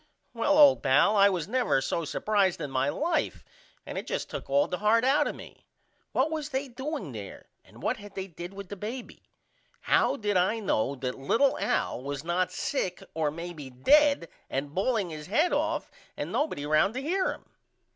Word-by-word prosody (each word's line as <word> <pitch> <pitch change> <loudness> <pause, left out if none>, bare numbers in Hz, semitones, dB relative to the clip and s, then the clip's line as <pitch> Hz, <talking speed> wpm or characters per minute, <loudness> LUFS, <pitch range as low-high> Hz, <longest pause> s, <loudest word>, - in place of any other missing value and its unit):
Well 250 +5 +2
old 290 -3 +7
pal 145 +10 +4
I 200 0 +6
was 180 -4 -2
never 245 - +2
so 165 +4 -2
supprised 200 +2 +1
in 140 - -4
my 135 +1 +1
life 325 - -1 0.4
and - - -4
it - - -9
just - - -3
took - - -6
all 285 +1 +3
the 180 - -4
heart 220 +3 +3
out 290 +3 +3
of - - -4
me. - - -13 0.4
What 280 +5 +1
was 305 -2 -3
they 275 0 -2
doing 260 - -5
there 105 -4 -8 0.2
and - - -16
what - - 0
had 205 -1 -12
they 190 - -3
did 175 0 -8
with 195 -1 -9
the 205 - -5
baby? 225 +6 -7 0.6
How - - +3
did 205 -6 0
I 185 +5 +2
know 140 - 0
that 130 0 -4
little 235 - +2
Al - - 0
was 140 +1 -5
not 175 +2 0
sick 185 -10 -2
or 155 -2 0
maybe 160 -3 -7
dead 280 - +4 0.2
and 140 +2 -3
balling 200 -1 0
his 155 -1 -7
head 305 - +2
off - - -1 0.3
and - - -4
nobody 290 - -1
round 155 +9 +2
to 260 - -2
hear 370 +5 +1
him? - - -10
200 Hz, 195 wpm, -28 LUFS, -, 0.6 s, old